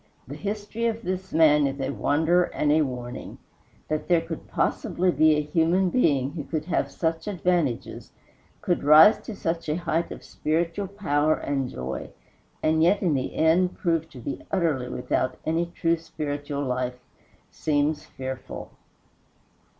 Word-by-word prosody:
The 135 - -7
history 210 +6 -3
of 230 0 -3
this 185 0 -4
man 150 -3 +5
is 135 +1 -4
a 135 0 -1
wonder 160 +6 +2
and 150 - 0
a 155 +1 +4
warning. 125 -3 -5 0.5
That 155 0 -2
there 175 -2 +4
could 165 -1 -7
possibly 185 +1 0
be 155 -1 +4
a 150 - +1
human 170 +5 +2
being 140 - +2
who 155 -1 -5
could 155 +1 -3
have 180 - 0
such 165 +2 -2
advantages, 175 - -1 0.5
could 175 - 0
rise 155 +8 +8
to 225 - -8
such 165 -3 -3
a 150 - +1
height 170 -1 -1
of - - -8
spiritual 165 +5 -1
power 155 -6 +1
and 135 -3 -2
joy, 65 +1 -5 0.5
and 160 0 +3
yet 190 +5 +3
in 170 -5 +2
the 130 -2 -2
end 170 +3 +3
prove 165 -2 0
to 130 - -12
be 130 +3 -5
utterly 155 -10 0
without 125 +1 -1
any 165 +2 0
true 170 -1 0
spiritual 145 -3 -4
life 125 -1 -2 0.5
seems 150 0 0
fearful. 130 -1 -7
160 Hz, 155 wpm, -25 LUFS, 145-175 Hz, 0.5 s, rise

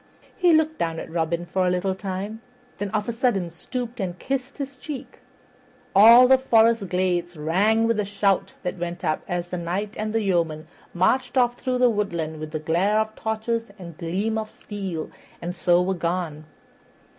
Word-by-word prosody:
He 360 -4 +4
looked 315 0 +2
down 165 -1 -1
at - - -8
Robin 170 +1 -1
for 185 +2 0
a - - +3
little 180 +2 0
time, 195 +3 -5 0.4
then 205 0 -2
of 210 0 -2
a - - 0
sudden 225 -7 0
stooped 245 +7 -6
and 180 -3 -3
kissed 270 +3 -3
his 280 -1 -5
cheek. 285 +1 -8 0.8
All 230 +5 +9
the 265 0 +6
forest 230 -5 +3
glades 175 -2 0
rang 200 +9 +2
with 230 -1 +1
the 210 - +1
shout 200 -1 0
that 180 0 -3
went 175 0 -4
up 155 - 0
as 175 0 -3
the 180 - -2
Knight 195 +5 -3
and 215 0 -2
the 225 0 0
yeomen 165 -5 0 0.3
marched 250 +10 +1
off 245 -1 +4
through 255 -1 -1
the 250 0 +5
woodland 170 -7 -2
with 155 0 -5
glare 185 +7 +2
of 220 0 -2
torches 225 +1 -2
and 170 -4 -10
gleam 200 +7 -1
of 215 0 -5
steel, 195 -8 -6 0.3
and 175 +1 -5
so 175 0 +3
were 190 +1 0
gone. 170 -3 -3
195 Hz, 180 wpm, -24 LUFS, 175-225 Hz, 0.8 s, All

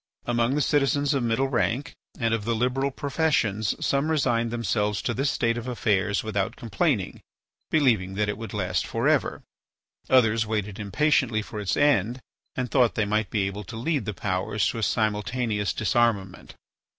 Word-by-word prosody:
Among 120 +2 +1
the 150 - +2
citizens 145 0 +2
of 135 - 0
middle 120 +3 +1
rank 130 +1 -1 0.3
and 115 -2 +1
of 115 -2 -1
the 115 +2 0
liberal 125 +4 0
professions 135 -8 0
some 140 +3 +1
resigned 120 -7 +1
themselves 105 -3 -1
to 120 - -1
this 135 +5 0
state 115 -4 0
of 120 - -8
affairs 105 -4 0
without 105 -3 -2
complaining, 115 -9 -1 0.5
believing 110 -11 +2
that 105 +1 0
it 105 - -1
would 115 +1 -7
last 90 -4 -1
for - - -1
ever; - - +1 0.7
others 115 -3 +4
waited 105 -2 -3
impatiently 110 +1 +1
for 105 - -7
its 100 -2 -1
end 130 -5 +2 0.4
and 125 -2 -3
thought 125 -4 +3
they 110 - +1
might 110 +1 0
be 105 -3 0
able 100 +2 -4
to 115 - -8
lead 140 0 -1
the 105 - -3
powers 95 +2 -1
to 115 - -4
a - - -2
simultaneous 105 0 0
disarmament. 110 -4 0
115 Hz, 170 wpm, -25 LUFS, 105-130 Hz, 0.7 s, others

